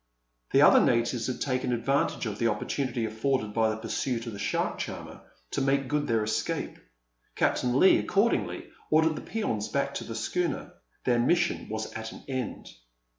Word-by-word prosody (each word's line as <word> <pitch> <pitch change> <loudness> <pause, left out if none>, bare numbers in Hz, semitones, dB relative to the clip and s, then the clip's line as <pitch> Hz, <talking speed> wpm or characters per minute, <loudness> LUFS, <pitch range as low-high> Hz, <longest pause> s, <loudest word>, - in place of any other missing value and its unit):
The - - +5
other - - +8
natives 115 0 +1
had 130 - -3
taken 130 -2 0
advantage 135 +3 0
of 105 -2 -4
the 115 - +2
opportunity 120 +2 -1
afforded 110 0 -1
by 110 0 +3
the 110 - -2
pursuit 115 +1 -2
of 115 - -5
the 100 - -7
shark - - -1
charmer - - -6 0.3
to - - -1
make 135 0 +1
good 145 +2 0
their 115 -3 +2
escape. 105 - -2 0.6
Captain 125 0 +1
Leigh 190 - +7
accordingly 210 +4 0 0.2
ordered 160 0 +4
the - - -5
peons 115 - -2
back 140 - -1
to - - -4
the 115 - -6
schooner. 170 +10 -2 0.3
Their 120 -1 +2
mission 175 +8 +1
was 110 0 -4
at 110 0 -6
an - - -12
end. 130 -4 -4
125 Hz, 175 wpm, -28 LUFS, 110-140 Hz, 0.6 s, other